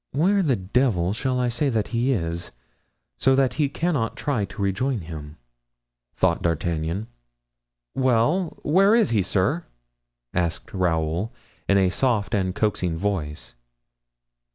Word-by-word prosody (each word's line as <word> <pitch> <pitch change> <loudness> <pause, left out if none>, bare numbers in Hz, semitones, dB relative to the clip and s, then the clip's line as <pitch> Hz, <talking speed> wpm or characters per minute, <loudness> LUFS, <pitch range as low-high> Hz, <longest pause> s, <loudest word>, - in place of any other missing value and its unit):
"Where 190 +8 +3
the 145 -8 +2
devil 95 -2 +1
shall 125 +3 -1
I 125 -1 +1
say 120 +5 0
that 110 -4 -1
he 120 +3 +1
is, 85 -6 -2 0.7
so 135 0 +4
that 135 -1 +2
he 145 - +2
cannot 145 -8 -1
try 130 -9 0
to - - -12
rejoin 110 +5 0
him?" 80 -2 -8 0.8
thought - - +2
D'Artagnan. 85 +3 -1 0.9
"Well, 130 +8 +1
where 195 +8 +5
is 225 - +3
he, 110 -3 +3
sir?" 105 - 0 0.7
asked 85 -2 -2
Raoul, 85 +2 0 0.4
in 100 - +5
a 95 -2 +3
soft 120 -3 0
and 95 -2 0
coaxing 95 -6 0
voice. 80 -6 -3
105 Hz, 130 wpm, -24 LUFS, 90-135 Hz, 0.9 s, where